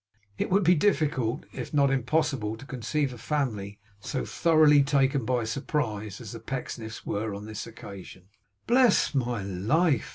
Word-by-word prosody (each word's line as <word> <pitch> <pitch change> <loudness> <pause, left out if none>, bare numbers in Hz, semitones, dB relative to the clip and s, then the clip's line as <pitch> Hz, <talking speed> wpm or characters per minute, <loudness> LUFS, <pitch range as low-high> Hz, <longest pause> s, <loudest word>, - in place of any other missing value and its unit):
It - - -1
would 195 +2 +3
be 175 +1 +6
difficult, 145 - +1
if 130 +3 -6
not 140 -1 +4
impossible, 130 -4 0
to 135 - -11
conceive 135 +2 -2
a 120 - -11
family 110 -10 -2 0.2
so 130 +6 -3
thoroughly 155 -3 +5
taken 135 -2 +2
by 125 -1 +1
surprise 110 -4 -3
as 115 -4 -8
the 115 - -7
Pecksniffs 115 -2 -6
were, 105 0 -2
on 100 +1 -7
this 110 +1 -6
occasion. 100 -4 -10 0.4
Bless 245 -7 +4
my 120 -6 -1
life! 115 - +1
130 Hz, 155 wpm, -27 LUFS, 110-150 Hz, 0.4 s, be